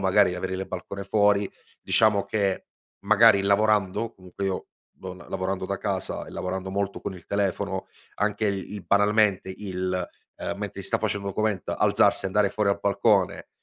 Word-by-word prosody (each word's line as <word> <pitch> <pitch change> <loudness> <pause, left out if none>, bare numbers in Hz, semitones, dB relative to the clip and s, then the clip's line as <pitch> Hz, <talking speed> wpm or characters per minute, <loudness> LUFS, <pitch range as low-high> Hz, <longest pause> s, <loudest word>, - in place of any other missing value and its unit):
magari 95 -1 +4
avere 95 +1 -3
il 95 +1 -4
balcone 100 +2 -6
fuori. 105 -1 +3 0.3
Diciamo 105 -3 +3
che 100 -1 -1 0.4
magari 110 -1 +6
lavorando, 105 +1 +2
comunque 95 +1 -8
io 95 -1 -2 0.2
do 95 -1 -9
l 90 -1 -13
lavorando 95 0 -2
da 100 +1 -3
casa - - -3
e - - -10
lavorando 95 +1 -4
molto 100 0 -2
con 95 - -5
il 90 -3 -12
telefono, 100 -1 -1 0.3
anche 105 +1 0
il 100 -1 -2
il 100 -4 -7
banalmente 105 +1 +3
il 95 -2 -3 0.3
ehm, - - -4
mentre - - -5
si - - -6
sta - - +1
face - - -1
il 100 - -6
document 100 -1 -1
alzarsi - - +3
e - - +2
andare 100 +1 +2
fuori 105 -2 0
a 100 - +4
balcone, 100 -1 +1
100 Hz, 175 wpm, -26 LUFS, 95-105 Hz, 0.4 s, magari